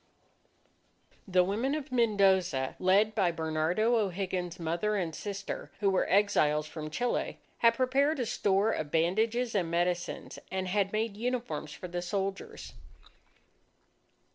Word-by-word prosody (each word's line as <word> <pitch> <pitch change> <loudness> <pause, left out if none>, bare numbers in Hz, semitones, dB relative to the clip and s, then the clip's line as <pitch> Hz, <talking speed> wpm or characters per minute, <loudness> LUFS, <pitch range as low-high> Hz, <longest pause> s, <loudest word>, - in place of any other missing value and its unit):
The 185 -1 +4
women 225 +10 0
of 300 -2 -5
Mendoza, 195 - +2
led 200 +4 +3
by 190 -5 +2
Bernardo 165 +8 +1
O'Higgins's 185 -4 -2
mother 170 +6 -1
and 175 -5 -2
sister 200 +3 -5
who 200 -2 +2
were 190 - +1
exiles 155 -7 +3
from 155 0 -7
Chile, 240 +10 -1 0.2
had 230 -1 +5
prepared 275 +4 +2
a 245 - 0
store 205 -1 +1
of 155 - -3
bandages 220 +10 +1
and 180 -5 0
medicines, 175 +1 -2
and 190 0 -2
had 195 +1 +1
made 215 -1 -1
uniforms 235 -11 -3
for 165 +5 -8
the 175 0 -4
soldiers. 195 +2 -4
195 Hz, 130 wpm, -30 LUFS, 175-220 Hz, 0.2 s, had